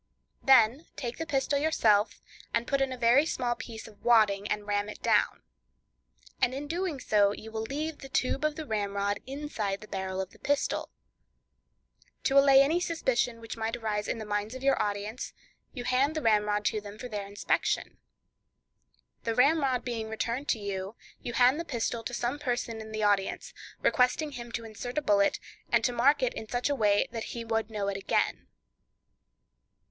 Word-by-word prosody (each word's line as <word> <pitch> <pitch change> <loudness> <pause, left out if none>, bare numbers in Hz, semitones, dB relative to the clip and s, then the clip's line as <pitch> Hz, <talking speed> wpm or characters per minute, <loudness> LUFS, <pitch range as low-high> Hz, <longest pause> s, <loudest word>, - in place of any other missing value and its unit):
Then 265 +2 +5
take 240 -3 -5
the 325 - -3
pistol 280 -1 +1
yourself, 220 -9 +2 0.3
and 230 0 +1
put 275 +1 0
in 270 -1 +1
a 255 - -4
very 245 +4 +5
small 250 -6 -1
piece 230 -2 -8
of 210 -2 -17
wadding, 210 -4 +4
and 210 -1 -2
ram 205 0 -1
it - - -8
down; - - +2 1.0
and 255 - +2
in 280 +2 -4
doing 340 -2 -2
so 205 -4 +3
you 220 +1 -9
will 220 0 -3
leave 295 +6 -4
the 270 - -10
tube 270 +1 0
of 305 -1 +1
the 315 - -5
ramrod 200 -2 -1
inside 260 -8 -3
the 215 - -12
barrel 190 -1 -3
of 190 -1 -3
the - - -19
pistol. 285 0 0 1.3
To 275 +1 +5
allay 275 -1 +7
any 320 +5 +2
suspicion 260 -9 0
which 230 -1 -7
might 225 0 -2
arise 210 -2 -2
in - - -1
the 220 - -6
minds 210 +3 -2
of 260 - -8
your 275 0 +3
audience, 205 +4 -3 0.4
you 245 - -6
hand 260 +5 +2
the 310 - -1
ramrod 210 -2 +2
to 215 - +1
them 205 0 -10
for 250 - -6
their 205 -4 -5
inspection. 200 +1 -1 1.2
The 230 -1 -1
ramrod 270 -1 +3
being 225 -3 -3
returned 235 +5 -3
to 225 - +2
you, 200 0 -4 0.3
you 240 - -5
hand 255 +5 +4
the - - -2
pistol 235 -6 -2
to 245 - -4
some 245 +4 -2
person 240 -4 -2
in 220 0 -9
the 215 0 -2
audience, 200 -2 +1 0.3
requesting 265 +4 +2
him 240 -3 -8
to 230 - -3
insert 235 +4 -7
a - - +3
bullet, 200 -4 +3 0.3
and - - +3
to 250 - +2
mark 270 +4 +3
it 250 - +1
in 220 - -7
such 245 +3 0
a - - +1
way 205 -4 +3
that 230 -2 -4
he 230 - -4
would 225 -1 -1
know 210 -2 -3
it 200 -1 -1
again. 195 - 0
235 Hz, 190 wpm, -29 LUFS, 210-270 Hz, 1.3 s, allay